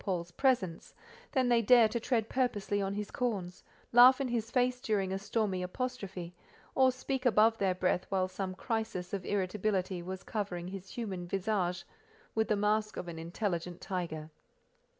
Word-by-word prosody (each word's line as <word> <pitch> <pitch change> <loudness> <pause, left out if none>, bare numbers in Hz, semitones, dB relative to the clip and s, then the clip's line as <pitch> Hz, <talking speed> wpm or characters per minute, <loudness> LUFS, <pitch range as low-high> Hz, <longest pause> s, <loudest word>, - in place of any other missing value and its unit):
Paul's 175 -3 -2
presence, 195 -6 0 0.4
than 260 -3 +3
they 240 -1 +4
dare 235 0 +7
tread 225 0 0
purposely 210 -6 0
on 195 0 -2
his 210 0 -4
corns, 195 -8 -3 0.3
laugh 250 +3 +8
in 270 -2 -1
his 230 -2 -1
face 250 +1 +1
during 195 -5 0
a 195 - -2
stormy 200 -2 -1
apostrophe, 190 -4 -4 0.4
or 260 -1 +5
speak 260 +1 -3
above 225 -2 +4
their 190 -2 +2
breath 180 0 0
while 190 -1 +1
some 185 0 -4
crisis 220 -4 -3
of 195 -2 -2
irritability 190 -1 -1
was 185 +2 -6
covering 180 -5 -3
his 190 0 -8
human 190 -7 -5
visage 185 -2 -1 0.5
with 220 0 +1
the 215 - +2
mask 210 +1 +1
of 175 - -5
an 165 -1 -6
intelligent 175 0 -3
tiger. 160 -4 -4
200 Hz, 160 wpm, -32 LUFS, 180-230 Hz, 0.5 s, laugh